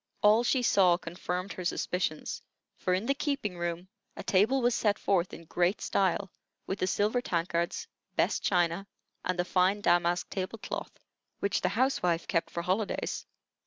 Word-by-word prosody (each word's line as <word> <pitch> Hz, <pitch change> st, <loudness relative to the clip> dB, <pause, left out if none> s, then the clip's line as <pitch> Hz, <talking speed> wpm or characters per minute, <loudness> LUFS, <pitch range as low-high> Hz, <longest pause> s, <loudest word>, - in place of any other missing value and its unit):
All 215 Hz, +3 st, +6 dB
she 250 Hz, +1 st, +2 dB
saw 185 Hz, -6 st, +5 dB
confirmed 180 Hz, +2 st, -4 dB
her 185 Hz, -, -6 dB
suspicions; 175 Hz, -2 st, -2 dB, 0.3 s
for 180 Hz, -, 0 dB
in 190 Hz, +4 st, -2 dB
the 275 Hz, -, +2 dB
keeping 275 Hz, -, -2 dB
room 175 Hz, +1 st, -3 dB, 0.3 s
a -, -, -5 dB
table 215 Hz, +8 st, +3 dB
was 245 Hz, -1 st, +3 dB
set 210 Hz, -3 st, +2 dB
forth 185 Hz, -2 st, +1 dB
in -, -, -9 dB
great 175 Hz, +5 st, +1 dB
style, 195 Hz, 0 st, 0 dB, 0.3 s
with 190 Hz, -, -3 dB
the 185 Hz, -, +1 dB
silver 210 Hz, +6 st, +1 dB
tankards, 170 Hz, -, -1 dB, 0.3 s
best -, -, +2 dB
china, 175 Hz, +1 st, +1 dB, 0.4 s
and 185 Hz, 0 st, -1 dB
the 175 Hz, -, +1 dB
fine 185 Hz, +3 st, +2 dB
damask 175 Hz, -2 st, +2 dB
table 190 Hz, +3 st, -3 dB
cloth, -, -, -6 dB, 0.4 s
which 200 Hz, -, 0 dB
the -, -, +2 dB
housewife 195 Hz, -9 st, +1 dB
kept 165 Hz, -, 0 dB
for 170 Hz, -, -4 dB
holidays. 195 Hz, +4 st, -1 dB
185 Hz, 160 wpm, -30 LUFS, 175-210 Hz, 0.4 s, All